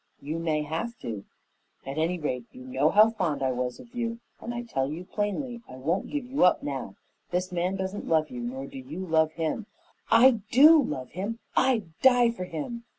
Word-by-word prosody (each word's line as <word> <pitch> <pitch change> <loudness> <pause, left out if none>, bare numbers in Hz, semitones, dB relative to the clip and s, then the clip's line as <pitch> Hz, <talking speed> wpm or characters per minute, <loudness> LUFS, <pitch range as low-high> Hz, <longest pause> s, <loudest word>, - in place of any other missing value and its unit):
"You 155 +4 -4
may 155 -2 0
have 165 +11 -4
to. 105 -4 -5 0.6
At 135 +3 -4
any 170 +3 +1
rate, 125 -7 -3
you 130 - -12
know 130 +4 +1
how 215 +4 +6
fond 175 -11 -1
I 130 - +2
was 125 0 -3
of 235 - -14
you, 230 -1 -3 0.2
and 235 - -5
I 240 0 -4
tell 135 - -1
you 170 +4 -6
plainly, 230 +5 -3
I 130 - -9
won't 160 +9 -1
give 290 -4 -3
you 265 +3 +1
up 180 - +4
now. 135 -8 -4 0.3
This 180 +1 -1
man 180 +2 0
doesn't 190 +1 -4
love 155 -1 +2
you, 125 - -5
nor 130 +3 -4
do 135 - -9
you 155 +9 -6
love 160 -2 +2
him 165 +7 -2 0.2
" - - -37
"I 230 +1 +6
DO 300 +6 +8
love 135 - -4
him, 200 +6 -4 0.2
I'd 220 -11 +2
die 245 -2 +6
for 185 -6 -5
him! 205 +9 -5
175 Hz, 210 wpm, -27 LUFS, 145-230 Hz, 0.6 s, DO